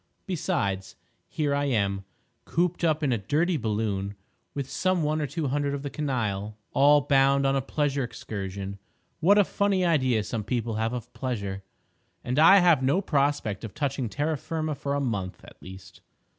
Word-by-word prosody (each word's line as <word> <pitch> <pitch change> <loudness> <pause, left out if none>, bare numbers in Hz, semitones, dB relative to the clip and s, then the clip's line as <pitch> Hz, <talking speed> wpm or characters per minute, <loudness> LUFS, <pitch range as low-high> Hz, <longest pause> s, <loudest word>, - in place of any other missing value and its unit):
Besides, 145 - -2 0.3
here 145 -2 0
I 145 0 +1
am, 100 -7 0 0.4
cooped 175 +1 0
up 155 -2 +2
in 135 -4 +2
a 115 - -1
dirty 160 - +1
balloon, 105 -5 -2 0.4
with 140 -2 -3
some 185 +2 0
one 155 +1 0
or 150 - -1
two 145 0 -2
hundred 140 +1 0
of 140 - -6
the 140 - -4
canaille, 110 -8 -2 0.2
all 145 +1 +6
bound 140 0 +3
on 135 0 +2
a 135 - +1
pleasure 140 0 -1
excursion, 100 -4 -6 0.4
(what 190 +6 +5
a 205 - +7
funny 195 -1 +1
idea 130 -10 +2
some 110 +1 -3
people 115 0 -2
have 110 +2 -1
of 120 -1 -6
pleasure!) 100 -7 -3 0.6
and 125 +3 -1
I 165 +5 +8
have 170 -6 +5
no 135 +8 +2
prospect 140 - 0
of 110 - -7
touching 135 -4 -1
terra 150 +5 -1
firma 155 +2 -3
for 140 0 -3
a - - 0
month 100 -9 -3
at - - -15
least. 95 +1 -12
135 Hz, 175 wpm, -27 LUFS, 110-150 Hz, 0.6 s, I